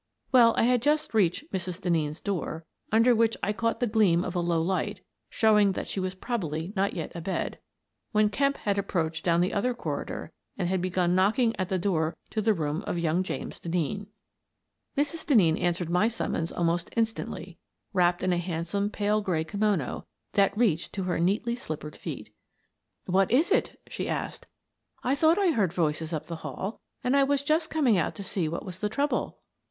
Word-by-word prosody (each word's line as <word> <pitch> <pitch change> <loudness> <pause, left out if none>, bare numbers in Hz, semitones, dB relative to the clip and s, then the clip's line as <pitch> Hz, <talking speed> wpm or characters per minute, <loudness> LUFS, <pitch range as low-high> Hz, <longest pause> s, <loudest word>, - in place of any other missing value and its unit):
Well, 235 -3 +6
I - - +4
had 245 0 +3
just 305 +2 +1
reached 215 - +1
Mrs. 180 -1 -3
Denneen's 160 -4 0
door, 165 -4 -3 0.3
under 230 +3 +5
which 225 0 +2
I 210 - +1
caught 230 +2 -1
the 245 - +2
gleam 205 -6 +3
of 180 - -4
a 180 - 0
low 170 -1 +1
light, 185 +3 -1 0.3
showing 210 -3 +4
that - - -4
she - - -3
was 185 0 -2
probably 180 - -3
not 195 0 +1
yet 165 -4 -4
abed, 175 +3 -3 0.5
when 215 -1 +3
Kemp 275 +5 +1
had 200 -1 0
approached 165 -4 -1
down 170 -1 +3
the 180 - +1
other 245 +4 0
corridor - - -4 0.3
and 180 -3 0
had 185 0 0
begun 180 -1 +1
knocking 220 +6 +3
at 185 -1 -2
the 190 - +1
door 170 -3 0
to 220 - 0
the 215 0 +3
room 155 0 -2
of - - -1
young 170 +1 +1
James 185 - -5
Denneen. 180 +4 -2 0.9
Mrs. 295 +3 0
Denneen 190 - +4
answered 175 -1 0
my 180 +5 +4
summons 220 -7 -2
almost 170 0 0
in 230 - +5
stantly, 225 0 -6 0.4
wrapped 175 -2 +2
in 185 -1 +2
a - - +1
handsome 175 +4 -2
pale 210 0 +1
gray 175 -6 0
kimono 200 -5 -1 0.3
that 200 0 +3
reached 195 -9 +1
to 195 - -2
her 180 -2 -1
neatly 205 +7 +1
slippered 155 -8 -6
feet. - - -7 0.4
" - - -54 0.3
What 190 +1 +2
is 295 - +3
it? - - +1
" - - -42
she - - -4
asked. - - -4 0.3
" - - -38
I 255 - +2
thought 315 +4 +4
I 390 -4 +3
heard 205 - +1
voices 160 -1 0
up 155 -3 -3
the 170 - -6
hall, 195 +5 -5 0.2
and 250 +1 +2
I 280 - +5
was 280 0 +1
just 315 +2 +1
coming 260 - +3
out 165 - -1
to 200 - -6
see 185 -4 -1
what 170 - -4
was 185 -1 -7
the 210 - -1
trouble." 285 +7 -1
195 Hz, 200 wpm, -28 LUFS, 170-225 Hz, 0.9 s, Well